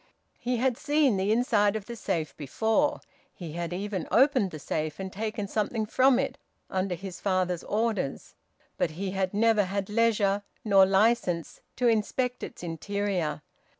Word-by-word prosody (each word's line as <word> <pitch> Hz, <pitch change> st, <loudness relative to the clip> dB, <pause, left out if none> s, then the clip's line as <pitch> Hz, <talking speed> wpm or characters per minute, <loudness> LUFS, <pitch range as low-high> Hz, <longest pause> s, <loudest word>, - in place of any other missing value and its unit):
He 245 Hz, 0 st, -1 dB
had 250 Hz, 0 st, +1 dB
seen 290 Hz, -5 st, +3 dB
the 195 Hz, +2 st, +1 dB
inside 220 Hz, -3 st, +3 dB
of 215 Hz, -2 st, -4 dB
the 235 Hz, -, -7 dB
safe 165 Hz, -8 st, -2 dB
before; 220 Hz, -, 0 dB, 0.3 s
he 170 Hz, -4 st, -7 dB
had 170 Hz, +1 st, -4 dB
even 190 Hz, 0 st, -3 dB
opened 260 Hz, -5 st, +4 dB
the 155 Hz, -, -7 dB
safe, 155 Hz, +2 st, -3 dB
and 190 Hz, -1 st, -5 dB
taken 215 Hz, 0 st, -3 dB
something 215 Hz, +2 st, -1 dB
from 255 Hz, +4 st, +4 dB
it, 270 Hz, -, -2 dB, 0.3 s
under 185 Hz, -1 st, -1 dB
his 190 Hz, 0 st, -8 dB
father's 185 Hz, -3 st, 0 dB
orders. 210 Hz, -9 st, -1 dB, 0.5 s
But -, -, +2 dB
he 190 Hz, 0 st, -2 dB
had 190 Hz, -1 st, -1 dB
never 215 Hz, -1 st, +3 dB
had 195 Hz, +1 st, -3 dB
leisure, 210 Hz, -3 st, +2 dB, 0.2 s
nor 195 Hz, -2 st, +6 dB
licence, 195 Hz, -4 st, +1 dB
to 245 Hz, -, +1 dB
inspect 245 Hz, +3 st, 0 dB
its -, -, -8 dB
interior. 175 Hz, -2 st, -2 dB
205 Hz, 155 wpm, -28 LUFS, 185-230 Hz, 0.5 s, nor